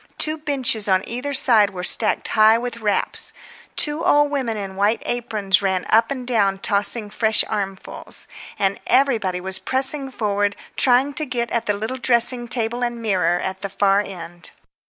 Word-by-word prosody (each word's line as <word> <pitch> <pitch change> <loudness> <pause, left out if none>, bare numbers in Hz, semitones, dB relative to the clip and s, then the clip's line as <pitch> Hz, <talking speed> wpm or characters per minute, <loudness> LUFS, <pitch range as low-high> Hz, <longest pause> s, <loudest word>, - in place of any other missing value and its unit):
Two 310 0 +2
benches 260 -8 0
on 190 -1 +1
either 250 +5 -4
side 230 -7 +5
were 180 -2 -8
stacked 215 +3 +3
high 220 +1 +4
with 240 0 -5
wraps. 210 -2 +1 0.4
Two 300 +2 +3
old 290 0 +2
women 255 -6 -3
in 195 -2 -7
white 205 +3 0
aprons 215 -6 +1
ran 190 -2 -1
up 225 +1 +3
and 260 -3 -5
down 205 -6 +1
tossing 205 +2 -1
fresh 220 0 +2
armfuls. 195 -3 -5 0.3
And 195 0 -1
everybody 230 -8 +1
was 190 +1 -2
pressing 270 +1 0
forward 205 -4 -2 0.2
trying 260 +3 +2
to 310 - 0
get 235 -2 -3
at 235 - -2
the 205 - +1
little 220 +5 -5
dressing 240 0 +1
table 235 +1 0
and 240 -1 -3
mirror 180 -6 0
at 190 0 -5
the 200 - -5
far 200 +1 +1
end. 175 -3 -9
220 Hz, 170 wpm, -20 LUFS, 200-250 Hz, 0.4 s, side